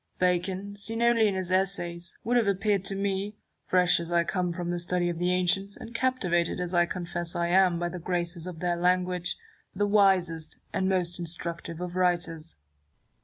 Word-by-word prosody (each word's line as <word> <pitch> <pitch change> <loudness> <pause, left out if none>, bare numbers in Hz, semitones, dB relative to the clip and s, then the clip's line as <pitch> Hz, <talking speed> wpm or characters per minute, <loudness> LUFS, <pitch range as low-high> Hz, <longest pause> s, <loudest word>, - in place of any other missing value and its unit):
Bacon, 185 +2 0
seen 225 +3 -2
only 235 -2 +4
in 200 - 0
his 185 -1 -2
Essays, 175 -2 0
would 240 +3 0
have 235 -4 +3
appeared 200 0 +1
to 195 - 0
me 200 +1 -2 0.3
(fresh 180 -1 +4
as 170 0 -5
I 170 0 +3
come 180 0 -1
from 175 0 -3
the 175 - -1
study 175 0 0
of 170 -1 -4
the 180 +1 +1
ancients, 185 +2 +1
and 230 - -10
captivated 185 -10 0
as 180 0 -3
I 175 -1 +4
confess 175 -1 -3
I 170 0 0
am 180 -1 +4
by 175 0 -1
the 180 - -6
graces 175 0 -2
of 175 -3 -7
their 175 -1 +1
language) 180 0 +1 0.4
the 205 +2 +1
wisest 190 -6 +2 0.2
and 190 0 +1
most 180 -2 0
instructive 170 -1 -4
of 180 0 -5
writers. 175 -3 0
180 Hz, 185 wpm, -28 LUFS, 175-195 Hz, 0.4 s, only